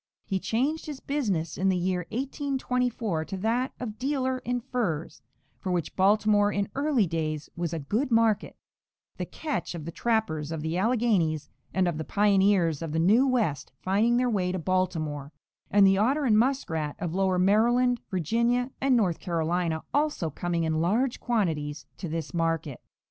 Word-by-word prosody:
He 195 Hz, -2 st, -1 dB
changed 275 Hz, +12 st, -1 dB
his 295 Hz, -3 st, -6 dB
business 200 Hz, -, -2 dB
in 195 Hz, +1 st, +2 dB
the 185 Hz, -, +2 dB
year 180 Hz, -1 st, -1 dB
1824 250 Hz, -, -1 dB
to 195 Hz, -, -5 dB
that 230 Hz, +6 st, 0 dB
of 220 Hz, -4 st, -6 dB
dealer 260 Hz, -1 st, 0 dB
in 245 Hz, 0 st, -2 dB
furs, 225 Hz, -, -3 dB, 0.4 s
for 185 Hz, -, -3 dB
which 170 Hz, -4 st, -2 dB
Baltimore 205 Hz, +1 st, +3 dB
in 200 Hz, 0 st, -1 dB
early 275 Hz, -6 st, +2 dB
days 155 Hz, -3 st, -3 dB
was 170 Hz, -1 st, -2 dB
a 165 Hz, -, -2 dB
good 210 Hz, -, -1 dB
market, 225 Hz, -3 st, +2 dB, 0.6 s
the -, -, -4 dB
catch 300 Hz, -, -4 dB
of 160 Hz, -3 st, -7 dB
the 170 Hz, -, -5 dB
trappers 170 Hz, -9 st, -1 dB
of 160 Hz, -2 st, -4 dB
the 160 Hz, +1 st, -2 dB
Alleghanies 195 Hz, -, +1 dB, 0.2 s
and 185 Hz, -1 st, +1 dB
of 165 Hz, -3 st, -2 dB
the -, -, -2 dB
pioneers 195 Hz, -5 st, +3 dB
of 165 Hz, -2 st, -4 dB
the -, -, 0 dB
new 215 Hz, +11 st, +4 dB
West 220 Hz, -, 0 dB
finding 215 Hz, +6 st, +2 dB
their 250 Hz, 0 st, +2 dB
way 190 Hz, -6 st, 0 dB
to 185 Hz, -, -2 dB
Baltimore, 160 Hz, -5 st, -1 dB, 0.4 s
and 200 Hz, 0 st, +5 dB
the 195 Hz, 0 st, +4 dB
otter 275 Hz, +7 st, +2 dB
and 215 Hz, -4 st, +4 dB
muskrat 160 Hz, -, 0 dB
of 175 Hz, -4 st, -4 dB
lower 190 Hz, -1 st, +1 dB
Maryland, 235 Hz, +6 st, +3 dB
Virginia 235 Hz, -, +1 dB
and 265 Hz, -2 st, +4 dB
North 185 Hz, -7 st, +1 dB
Carolina 170 Hz, -1 st, -1 dB
also 290 Hz, -, 0 dB
coming 170 Hz, +3 st, -2 dB
in 160 Hz, 0 st, 0 dB
large 230 Hz, +9 st, +1 dB
quantities 160 Hz, -11 st, -1 dB
to 180 Hz, -, -5 dB
this 165 Hz, 0 st, -4 dB
market. 165 Hz, -4 st, -1 dB
195 Hz, 170 wpm, -27 LUFS, 165-240 Hz, 0.6 s, and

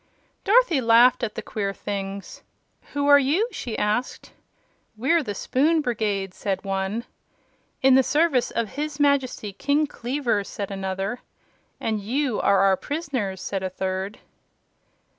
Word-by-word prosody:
Dorothy 405 Hz, -, +4 dB
laughed 235 Hz, +1 st, +5 dB
at 225 Hz, -, -2 dB
the -, -, -5 dB
queer 200 Hz, -2 st, -3 dB
things. 195 Hz, -1 st, -6 dB, 0.5 s
"Who 285 Hz, 0 st, 0 dB
are 285 Hz, 0 st, +7 dB
you?" 305 Hz, -, +2 dB
she 245 Hz, -, -5 dB
asked. 210 Hz, +4 st, -2 dB, 0.7 s
"We're 320 Hz, +9 st, +2 dB
the 205 Hz, -8 st, -5 dB
Spoon 310 Hz, -, +2 dB
Brigade," 210 Hz, -7 st, -2 dB
said 195 Hz, 0 st, -3 dB
one. 195 Hz, +4 st, -2 dB, 0.8 s
"In 265 Hz, 0 st, +6 dB
the 265 Hz, -, +7 dB
service 290 Hz, -2 st, +2 dB
of 230 Hz, -3 st, -2 dB
his 300 Hz, +3 st, -5 dB
Majesty 270 Hz, -7 st, +1 dB
King 285 Hz, +8 st, +1 dB
Kleaver," 245 Hz, -5 st, -1 dB
said 200 Hz, 0 st, -6 dB
another. 195 Hz, +3 st, -3 dB, 0.6 s
"And 215 Hz, -2 st, -2 dB
you 250 Hz, +3 st, -1 dB
are 200 Hz, -1 st, +4 dB
our 195 Hz, -1 st, +4 dB
prisoners," 255 Hz, -, -3 dB
said 195 Hz, -1 st, -3 dB
a 190 Hz, -, -2 dB
third. 190 Hz, +2 st, -3 dB
230 Hz, 140 wpm, -24 LUFS, 195-285 Hz, 0.8 s, are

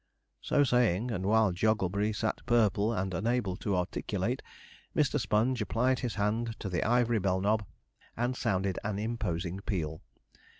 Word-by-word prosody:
So 145 Hz, -, +3 dB
saying, 125 Hz, -3 st, +2 dB
and 95 Hz, -3 st, -2 dB
while 110 Hz, -1 st, +4 dB
Jogglebury 105 Hz, +1 st, +1 dB
sat 110 Hz, +1 st, -2 dB
purple 110 Hz, -2 st, +3 dB
and 95 Hz, -4 st, -2 dB
unable 105 Hz, 0 st, 0 dB
to 100 Hz, -3 st, -1 dB
articulate, 90 Hz, -, -2 dB, 0.5 s
Mr. 145 Hz, -1 st, +2 dB
Sponge 110 Hz, +3 st, +1 dB
applied 125 Hz, +4 st, +1 dB
his 120 Hz, -4 st, -3 dB
hand 110 Hz, +3 st, 0 dB
to 100 Hz, -, -4 dB
the 90 Hz, -, 0 dB
ivory 120 Hz, -1 st, +2 dB
bell 95 Hz, -1 st, +1 dB
knob 105 Hz, +2 st, +1 dB, 0.5 s
and 120 Hz, +2 st, 0 dB
sounded 95 Hz, -5 st, 0 dB
an 100 Hz, -1 st, -2 dB
imposing 95 Hz, -5 st, -2 dB
peal. 80 Hz, -6 st, -3 dB
105 Hz, 145 wpm, -30 LUFS, 95-115 Hz, 0.5 s, while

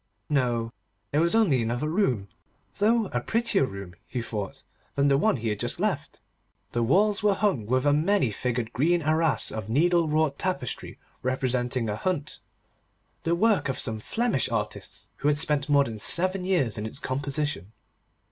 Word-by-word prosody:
No; 120 Hz, -5 st, 0 dB, 0.4 s
there 150 Hz, -, +2 dB
was 170 Hz, +5 st, +2 dB
only 175 Hz, -, +3 dB
another 120 Hz, +6 st, -1 dB
room, 155 Hz, -, 0 dB, 0.5 s
though 225 Hz, +2 st, +3 dB
a 120 Hz, -, 0 dB
prettier 225 Hz, -, +1 dB
room, 100 Hz, -2 st, -8 dB
he 125 Hz, -, -4 dB
thought, 110 Hz, -4 st, -5 dB, 0.3 s
than 140 Hz, -, +2 dB
the 140 Hz, -1 st, +4 dB
one 145 Hz, -, +2 dB
he 115 Hz, -1 st, -2 dB
had 105 Hz, -1 st, -2 dB
just -, -, -1 dB
left. -, -, -2 dB, 0.5 s
The 120 Hz, -, -1 dB
walls 195 Hz, -, +3 dB
were 205 Hz, -1 st, +3 dB
hung 190 Hz, -, 0 dB
with 130 Hz, +3 st, +1 dB
a 145 Hz, -, +4 dB
many 155 Hz, -, +2 dB
figured 120 Hz, +1 st, -3 dB
green 170 Hz, +5 st, +2 dB
arras 155 Hz, 0 st, +1 dB
of 110 Hz, -1 st, -5 dB
needle 170 Hz, +6 st, +3 dB
wrought 155 Hz, -2 st, +1 dB
tapestry 185 Hz, -, -3 dB, 0.2 s
representing 125 Hz, -1 st, -1 dB
a 105 Hz, -, -1 dB
hunt, 165 Hz, -, -2 dB, 0.9 s
the 170 Hz, +1 st, +2 dB
work 210 Hz, -4 st, +2 dB
of 135 Hz, -, -2 dB
some 110 Hz, -1 st, +1 dB
Flemish 225 Hz, -, 0 dB
artists 105 Hz, -3 st, -3 dB
who -, -, -1 dB
had 145 Hz, 0 st, +3 dB
spent 145 Hz, -1 st, +1 dB
more 140 Hz, -1 st, +5 dB
than 115 Hz, -5 st, -6 dB
seven 185 Hz, -, +3 dB
years 150 Hz, -, +1 dB
in 105 Hz, -, -3 dB
its 110 Hz, -, -5 dB
composition. 140 Hz, -, -2 dB
140 Hz, 170 wpm, -26 LUFS, 120-175 Hz, 0.9 s, more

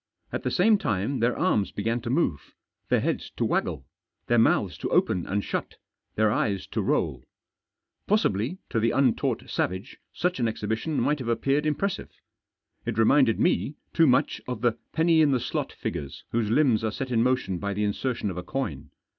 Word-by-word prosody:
At -, -, -2 dB
the -, -, -1 dB
same 205 Hz, +3 st, +4 dB
time 110 Hz, -, -1 dB
their 120 Hz, +2 st, +1 dB
arms 110 Hz, -, +2 dB
began 115 Hz, +3 st, -1 dB
to 120 Hz, -, -5 dB
move, 125 Hz, -, -1 dB, 0.3 s
their -, -, +3 dB
heads -, -, -2 dB
to -, -, +1 dB
waggle, 65 Hz, -, -1 dB, 0.4 s
their 120 Hz, -1 st, +3 dB
mouths 115 Hz, -, +3 dB
to -, -, -3 dB
open 90 Hz, -, +1 dB
and 100 Hz, +1 st, -1 dB
shut, -, -, -3 dB, 0.4 s
their 110 Hz, -1 st, +3 dB
eyes 100 Hz, -3 st, 0 dB
to -, -, -1 dB
roll. -, -, 0 dB, 0.8 s
Possibly, 160 Hz, -, +1 dB
to 115 Hz, -, +1 dB
the 115 Hz, +1 st, +2 dB
untaught 130 Hz, -3 st, +1 dB
savage, 95 Hz, +7 st, -3 dB
such 180 Hz, -4 st, -1 dB
an 120 Hz, -, +2 dB
exhibition 110 Hz, +7 st, -2 dB
might 150 Hz, 0 st, +1 dB
have 125 Hz, -, -5 dB
appeared 140 Hz, +5 st, +1 dB
impressive. 175 Hz, +6 st, -1 dB, 0.7 s
It -, -, -3 dB
reminded 115 Hz, +1 st, +4 dB
me 155 Hz, -4 st, +1 dB, 0.2 s
too 165 Hz, -1 st, +5 dB
much 125 Hz, -, +2 dB
of 125 Hz, -3 st, -4 dB
the 120 Hz, -1 st, +4 dB, 0.2 s
penny 165 Hz, 0 st, +4 dB
in 150 Hz, -, +5 dB
the 130 Hz, -2 st, +2 dB
slot -, -, -3 dB
figures 70 Hz, -1 st, -5 dB
whose 115 Hz, -2 st, 0 dB
limbs 120 Hz, -3 st, +3 dB
are 110 Hz, -, +1 dB
set 130 Hz, +2 st, -5 dB
in 115 Hz, -2 st, +3 dB
motion 125 Hz, -7 st, +1 dB
by 100 Hz, +1 st, -3 dB
the 105 Hz, -, 0 dB
insertion 105 Hz, 0 st, -1 dB
of 90 Hz, -, -7 dB
a 90 Hz, -, -4 dB
coin. 90 Hz, -, -4 dB
120 Hz, 185 wpm, -26 LUFS, 105-140 Hz, 0.8 s, too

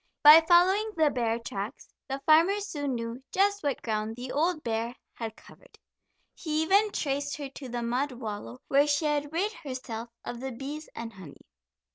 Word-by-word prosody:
By 305 Hz, +2 st, +11 dB
following 380 Hz, +5 st, +4 dB
the 310 Hz, -2 st, +4 dB
bear 230 Hz, -2 st, 0 dB
tracks 225 Hz, 0 st, -6 dB, 0.2 s
the 270 Hz, +1 st, -2 dB
farmer 330 Hz, +6 st, +5 dB
soon 290 Hz, -10 st, -3 dB
knew 230 Hz, +2 st, -5 dB
just 405 Hz, +1 st, +2 dB
what 285 Hz, -3 st, -2 dB
ground 215 Hz, 0 st, -2 dB
the 250 Hz, +1 st, -6 dB
old 320 Hz, +2 st, 0 dB
bear 230 Hz, +1 st, -2 dB, 0.2 s
had 225 Hz, -2 st, -6 dB
covered. -, -, -18 dB, 0.6 s
He 310 Hz, -2 st, -1 dB
even 400 Hz, +6 st, +4 dB
traced 285 Hz, -2 st, -2 dB
her 285 Hz, -2 st, -5 dB
to 270 Hz, -1 st, -9 dB
the 240 Hz, 0 st, -3 dB
mud 255 Hz, +4 st, -1 dB
wallow 205 Hz, -, -7 dB
where 280 Hz, +2 st, +4 dB
she 290 Hz, +2 st, +1 dB
had 295 Hz, -1 st, 0 dB
rid 390 Hz, +7 st, 0 dB
herself 255 Hz, -, -6 dB, 0.2 s
of 240 Hz, -, -5 dB
the 265 Hz, 0 st, -5 dB
bees 285 Hz, +5 st, -7 dB
and 230 Hz, 0 st, -6 dB
honey. 180 Hz, -7 st, -13 dB
275 Hz, 175 wpm, -28 LUFS, 235-315 Hz, 0.6 s, By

